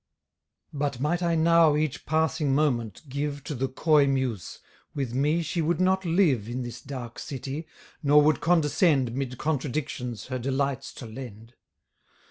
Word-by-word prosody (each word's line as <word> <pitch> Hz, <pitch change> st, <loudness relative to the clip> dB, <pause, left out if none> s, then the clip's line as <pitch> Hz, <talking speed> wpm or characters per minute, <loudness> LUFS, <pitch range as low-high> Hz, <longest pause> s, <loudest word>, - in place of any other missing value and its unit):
But 140 Hz, -3 st, -2 dB
might 160 Hz, +6 st, 0 dB
I 170 Hz, -1 st, +1 dB
now 165 Hz, -1 st, +5 dB
each 150 Hz, -1 st, -2 dB
passing 160 Hz, -3 st, +1 dB
moment 120 Hz, -, 0 dB
give 140 Hz, +1 st, -3 dB
To -, -, -5 dB
the 135 Hz, 0 st, -1 dB
coy 145 Hz, +2 st, +3 dB
muse, 130 Hz, -8 st, -2 dB, 0.4 s
with 135 Hz, -5 st, -2 dB
me 150 Hz, +6 st, +1 dB
she 165 Hz, +2 st, -2 dB
would 165 Hz, +2 st, 0 dB
not 190 Hz, +1 st, +2 dB
live 160 Hz, -, +2 dB
In 125 Hz, +1 st, -3 dB
this 120 Hz, 0 st, -7 dB
dark 125 Hz, -4 st, -7 dB
city, 140 Hz, +3 st, -5 dB, 0.3 s
nor 145 Hz, -1 st, +5 dB
would 150 Hz, -1 st, +3 dB
condescend 150 Hz, -6 st, +3 dB
'Mid 130 Hz, -1 st, -3 dB
contradictions 130 Hz, -6 st, -3 dB
her 130 Hz, -1 st, -4 dB
delights 135 Hz, +1 st, -1 dB
to -, -, -8 dB
lend. 115 Hz, -1 st, -9 dB
140 Hz, 150 wpm, -27 LUFS, 125-155 Hz, 0.4 s, now